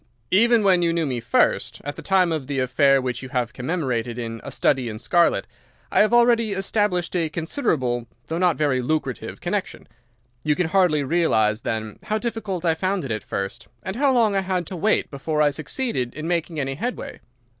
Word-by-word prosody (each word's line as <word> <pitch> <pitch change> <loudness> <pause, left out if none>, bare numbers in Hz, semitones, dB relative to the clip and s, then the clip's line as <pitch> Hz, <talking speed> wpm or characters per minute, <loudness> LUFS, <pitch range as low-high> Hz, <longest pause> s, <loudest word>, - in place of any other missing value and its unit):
Even 230 +3 +5
when 185 -3 +4
you 170 -1 +2
knew 165 -1 0
me 130 -4 -2
first, 115 - +1
at 145 +1 -5
the - - -8
time 185 -3 +2
of 155 -5 -2
the 140 -1 -3
affair 135 +2 +3
which 125 -2 -3
you 130 - -8
have 125 -3 -1
commemorated 125 -5 -2
in 115 -1 -5
'A - - -6
Study 130 -4 +1
in 110 - -6
Scarlet,' 170 +9 +2 0.5
I - - +3
had 215 - +5
already 235 -3 +4
established 195 -2 0
a 165 -3 +1
considerable, 140 - -1 0.2
though 165 +5 -3
not 180 -3 +3
a - - -15
very 140 -4 +1
lucrative, 135 -1 -3
connection. - - -3 0.6
You 150 -1 +2
can 175 -1 0
hardly 180 -6 +3
realize, 110 -9 +2
then, 110 -2 -4
how 215 - -1
difficult 215 -6 -3
I 165 - +4
found 185 0 -1
it 130 - -4
at 110 -1 -2
first, 100 +4 -5 0.2
and 190 - -4
how 275 +2 +3
long 225 -5 +3
I 195 - +2
had 185 -2 -1
to 185 - -6
wait 205 +5 +1
before 150 +2 -2
I 150 -1 +4
succeeded 155 - -3
in 155 +2 -5
making 170 -2 -1
any 135 -1 -1
headway. 240 - -5
160 Hz, 200 wpm, -23 LUFS, 130-190 Hz, 0.6 s, Even